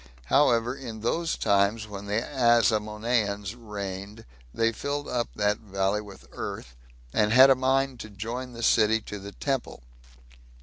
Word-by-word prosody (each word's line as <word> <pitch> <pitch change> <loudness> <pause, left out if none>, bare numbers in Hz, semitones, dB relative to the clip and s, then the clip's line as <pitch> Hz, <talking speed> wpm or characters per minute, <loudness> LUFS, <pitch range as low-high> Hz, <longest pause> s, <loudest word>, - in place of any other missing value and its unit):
However, 120 -3 +4
in 115 -5 -8
those 165 +9 -1
times 100 +2 +2
when 100 -1 -8
the 105 +3 0
Asamoneans 110 -4 +1
reigned, 105 -1 -7 0.3
they 115 - +1
filled 145 +5 -4
up 120 -2 -1
that 105 0 +1
valley 100 0 -1
with 100 -2 -13
earth, 60 - -7 0.4
and 105 0 +2
had 130 +3 +8
a - - +6
mind 130 0 +1
to 110 - -8
join 115 +5 -6
the 115 0 -7
city 110 0 +4
to 105 -1 -7
the 100 +1 -9
temple. 135 - -3
110 Hz, 145 wpm, -27 LUFS, 105-125 Hz, 0.4 s, had